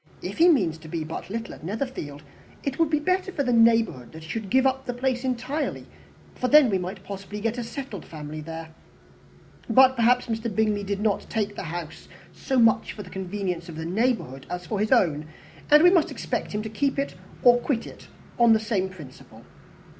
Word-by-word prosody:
"If -, -, -5 dB
he 345 Hz, +2 st, +7 dB
means 180 Hz, -, +2 dB
to 160 Hz, -, -12 dB
be 160 Hz, 0 st, -3 dB
but 160 Hz, +3 st, -7 dB
little 230 Hz, +3 st, -5 dB
at -, -, -13 dB
Netherfield, 185 Hz, -, -5 dB, 0.4 s
it 275 Hz, +1 st, -3 dB
would 330 Hz, -2 st, +3 dB
be 305 Hz, -, +2 dB
better 370 Hz, +4 st, 0 dB
for 285 Hz, -, -1 dB
the 245 Hz, -2 st, +1 dB
neighbourhood 225 Hz, -, +3 dB
that 160 Hz, 0 st, -10 dB
he 160 Hz, -, -11 dB
should 220 Hz, -1 st, -4 dB
give 260 Hz, +4 st, +3 dB
up 265 Hz, 0 st, 0 dB
the 245 Hz, -, -3 dB
place 255 Hz, 0 st, -1 dB
entirely, 260 Hz, +4 st, -2 dB, 0.5 s
for 255 Hz, -, -2 dB
then 285 Hz, -4 st, +6 dB
we 190 Hz, -, +1 dB
might 185 Hz, +2 st, -6 dB
possibly 200 Hz, +1 st, -7 dB
get 225 Hz, +3 st, -2 dB
a -, -, -2 dB
settled 230 Hz, -, -7 dB
family 155 Hz, -1 st, -8 dB
there. 160 Hz, +1 st, -8 dB, 1.0 s
But, 260 Hz, +3 st, +6 dB
perhaps, 245 Hz, +1 st, +3 dB
Mr. 230 Hz, 0 st, -2 dB
Bingley 215 Hz, -2 st, +1 dB
did 200 Hz, 0 st, -3 dB
not 210 Hz, -2 st, 0 dB
take 210 Hz, -2 st, -2 dB
the -, -, -5 dB
house 165 Hz, -1 st, -7 dB, 0.3 s
so 265 Hz, -, -2 dB
much 230 Hz, -2 st, +3 dB
for 205 Hz, -, -8 dB
the 180 Hz, -, -13 dB
convenience 185 Hz, -2 st, -4 dB
of 165 Hz, -, -8 dB
the 160 Hz, +1 st, -5 dB
neighbourhood 180 Hz, -, -1 dB
as 180 Hz, 0 st, -5 dB
for 210 Hz, +1 st, -3 dB
his 215 Hz, +1 st, 0 dB
own, 155 Hz, -, +3 dB, 0.4 s
and 300 Hz, +2 st, +7 dB
we 355 Hz, -, +8 dB
must 345 Hz, -5 st, +3 dB
expect -, -, -3 dB
him 210 Hz, 0 st, -2 dB
to 220 Hz, -, -5 dB
keep 275 Hz, +6 st, -1 dB, 0.5 s
or 245 Hz, 0 st, +7 dB
quit 245 Hz, -2 st, -1 dB
it -, -, -12 dB, 0.3 s
on 235 Hz, -1 st, +7 dB
the 220 Hz, -, +4 dB
same 210 Hz, -4 st, -1 dB
principle." 155 Hz, -9 st, -13 dB
220 Hz, 205 wpm, -25 LUFS, 180-255 Hz, 1.0 s, we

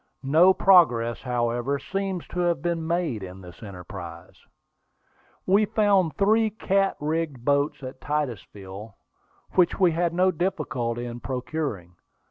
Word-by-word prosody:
No 160 Hz, +7 st, +5 dB
progress, 125 Hz, -13 st, +4 dB
however, 120 Hz, +2 st, -1 dB
seems 195 Hz, +2 st, -4 dB
to 180 Hz, -, -5 dB
have 170 Hz, -4 st, 0 dB
been 170 Hz, -2 st, -1 dB
made 170 Hz, -, -1 dB
in 95 Hz, 0 st, -8 dB
the 90 Hz, -2 st, -12 dB
enterprise. 90 Hz, -3 st, -9 dB, 1.1 s
We 200 Hz, +3 st, +4 dB
found 205 Hz, -6 st, +2 dB
three 220 Hz, +2 st, +3 dB
cat 195 Hz, -2 st, 0 dB
rigged 150 Hz, -4 st, -3 dB
boats 140 Hz, 0 st, +1 dB
at 130 Hz, 0 st, -8 dB
Titusville, 105 Hz, -8 st, -5 dB, 0.6 s
which 180 Hz, -2 st, +2 dB
we 180 Hz, -3 st, +5 dB
had 170 Hz, +1 st, 0 dB
no 185 Hz, +1 st, +3 dB
difficulty 125 Hz, -10 st, -2 dB
in 120 Hz, 0 st, -6 dB
procuring. 125 Hz, -, -4 dB
145 Hz, 125 wpm, -25 LUFS, 115-180 Hz, 1.1 s, No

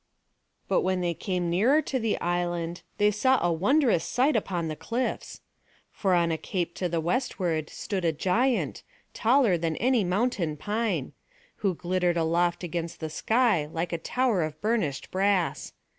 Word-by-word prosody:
But -, -, +2 dB
when 185 Hz, 0 st, 0 dB
they 175 Hz, -1 st, 0 dB
came 180 Hz, 0 st, -2 dB
nearer 235 Hz, -, +4 dB
to 260 Hz, -, -2 dB
the 225 Hz, -2 st, 0 dB
island 175 Hz, -1 st, -2 dB, 0.2 s
they 205 Hz, 0 st, +4 dB
saw 260 Hz, +5 st, +3 dB
a 175 Hz, -1 st, +1 dB
wondrous 225 Hz, -, +2 dB
sight 260 Hz, +3 st, +1 dB
upon 180 Hz, -6 st, -1 dB
the 155 Hz, -, -3 dB
cliffs. 240 Hz, +9 st, -3 dB, 0.5 s
For 190 Hz, -3 st, +1 dB
on 170 Hz, -1 st, +2 dB
a 160 Hz, -, -2 dB
cape 175 Hz, -3 st, -3 dB
to 180 Hz, -, -1 dB
the 170 Hz, 0 st, 0 dB
westward 170 Hz, -, -1 dB
stood 195 Hz, -3 st, -4 dB
a 165 Hz, -, +3 dB
giant, 225 Hz, -, 0 dB, 0.3 s
taller 230 Hz, -6 st, +3 dB
than 165 Hz, -1 st, -1 dB
any 245 Hz, +1 st, +2 dB
mountain 180 Hz, -4 st, 0 dB
pine; 200 Hz, -, -2 dB, 0.4 s
who 195 Hz, -4 st, 0 dB
glittered 175 Hz, 0 st, 0 dB
aloft 170 Hz, +2 st, +1 dB
against 170 Hz, -1 st, -4 dB
the 160 Hz, -1 st, -5 dB
sky 220 Hz, -5 st, +2 dB
like 165 Hz, +2 st, -3 dB
a 170 Hz, -, -1 dB
tower 240 Hz, +1 st, +1 dB
of 155 Hz, -1 st, -3 dB
burnished 210 Hz, -, -1 dB
brass. 190 Hz, -2 st, 0 dB
180 Hz, 160 wpm, -27 LUFS, 170-225 Hz, 0.5 s, nearer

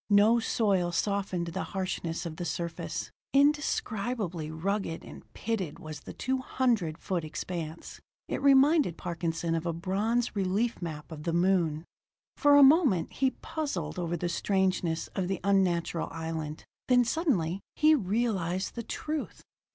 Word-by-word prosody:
No 210 Hz, +3 st, +6 dB
soil 200 Hz, -6 st, +1 dB
softened 190 Hz, -2 st, -1 dB
the 190 Hz, +3 st, -3 dB, 0.2 s
harshness 175 Hz, -2 st, -2 dB
of 160 Hz, -2 st, -5 dB
the -, -, -3 dB
surface; 170 Hz, -1 st, -4 dB, 0.2 s
indescribably 230 Hz, -, +1 dB
rugged 170 Hz, +1 st, -2 dB
and -, -, -12 dB
pitted 200 Hz, -9 st, -2 dB
was 155 Hz, -1 st, -8 dB
the -, -, -10 dB
two 260 Hz, +1 st, -1 dB
hundred 230 Hz, -11 st, 0 dB
foot 180 Hz, -4 st, -2 dB
expanse. 160 Hz, +1 st, -6 dB, 0.3 s
It -, -, -3 dB
reminded 275 Hz, -, +5 dB
Parkinson 165 Hz, -1 st, -2 dB
of 165 Hz, +1 st, -1 dB
a 170 Hz, -, 0 dB
bronze 205 Hz, +9 st, 0 dB
relief 200 Hz, +4 st, 0 dB
map 155 Hz, -2 st, -6 dB
of 155 Hz, -2 st, -7 dB
the 165 Hz, +2 st, -2 dB
moon. 170 Hz, -3 st, +2 dB, 0.5 s
For 290 Hz, 0 st, +5 dB
a 285 Hz, -, +9 dB
moment 270 Hz, -, +5 dB
he 265 Hz, 0 st, +2 dB
puzzled 180 Hz, -, -3 dB
over 170 Hz, 0 st, -1 dB
the 175 Hz, -, -2 dB
strangeness 185 Hz, -2 st, 0 dB
of 190 Hz, -2 st, -2 dB
the 195 Hz, -1 st, -2 dB
unnatural 180 Hz, -4 st, +1 dB
island; 160 Hz, -2 st, -5 dB, 0.2 s
then 245 Hz, -1 st, +5 dB
suddenly 220 Hz, -, 0 dB, 0.2 s
he 310 Hz, 0 st, +5 dB
realized 195 Hz, -, 0 dB
the 235 Hz, -, -4 dB
truth. 305 Hz, +6 st, -4 dB
185 Hz, 145 wpm, -29 LUFS, 165-235 Hz, 0.5 s, a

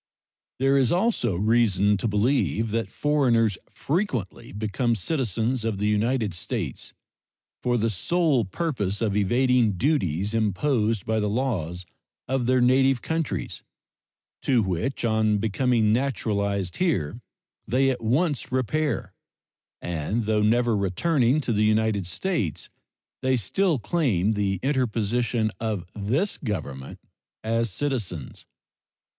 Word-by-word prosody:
There 135 Hz, +1 st, +3 dB
is 130 Hz, -3 st, +2 dB
also 180 Hz, -, +1 dB
reason 105 Hz, 0 st, +3 dB
to 95 Hz, -, -2 dB
believe 110 Hz, -, +1 dB
that 115 Hz, +1 st, -1 dB
foreigners 120 Hz, -9 st, +2 dB
frequently 140 Hz, -, -3 dB
become 110 Hz, +4 st, -1 dB
citizens 120 Hz, -, -1 dB
of 110 Hz, -3 st, -1 dB
the 105 Hz, -, -1 dB
United 105 Hz, 0 st, +1 dB
States 85 Hz, -, -4 dB, 0.7 s
for 120 Hz, 0 st, +1 dB
the 115 Hz, 0 st, +1 dB
sole 150 Hz, -, +1 dB
purpose 105 Hz, -, -2 dB
of 105 Hz, -4 st, 0 dB
evading 120 Hz, +2 st, +3 dB
duties 100 Hz, -, 0 dB
imposed 110 Hz, -, 0 dB
by 110 Hz, 0 st, 0 dB
the 105 Hz, -1 st, 0 dB
laws 95 Hz, -8 st, -2 dB, 0.4 s
of 130 Hz, -2 st, 0 dB
their 130 Hz, 0 st, +3 dB
native 130 Hz, 0 st, +3 dB
countries, 160 Hz, -2 st, -3 dB, 0.8 s
to 125 Hz, -4 st, +2 dB
which 95 Hz, +9 st, -2 dB
on 110 Hz, -2 st, +2 dB
becoming 110 Hz, +1 st, +1 dB
naturalized 100 Hz, -7 st, -1 dB
here 120 Hz, -, 0 dB, 0.5 s
they 135 Hz, +2 st, +2 dB
at 125 Hz, -, -4 dB
once 140 Hz, +6 st, 0 dB
repair, 135 Hz, +4 st, -1 dB, 0.7 s
and 90 Hz, +7 st, -2 dB
though 105 Hz, 0 st, +1 dB
never 115 Hz, +2 st, +3 dB
returning 120 Hz, -, +1 dB
to 120 Hz, -, -1 dB
the 105 Hz, 0 st, +2 dB
United 110 Hz, -3 st, +1 dB
States 105 Hz, -, -2 dB, 0.5 s
they 130 Hz, -1 st, +2 dB
still 165 Hz, -, +1 dB
claim 110 Hz, -, +1 dB
the 100 Hz, -3 st, 0 dB
interposition 120 Hz, -3 st, 0 dB
of 110 Hz, -5 st, -2 dB
this 125 Hz, -, -1 dB
Government 75 Hz, -, -5 dB, 0.4 s
as 115 Hz, +1 st, 0 dB
citizens. 105 Hz, -, -4 dB
115 Hz, 120 wpm, -25 LUFS, 105-130 Hz, 0.8 s, There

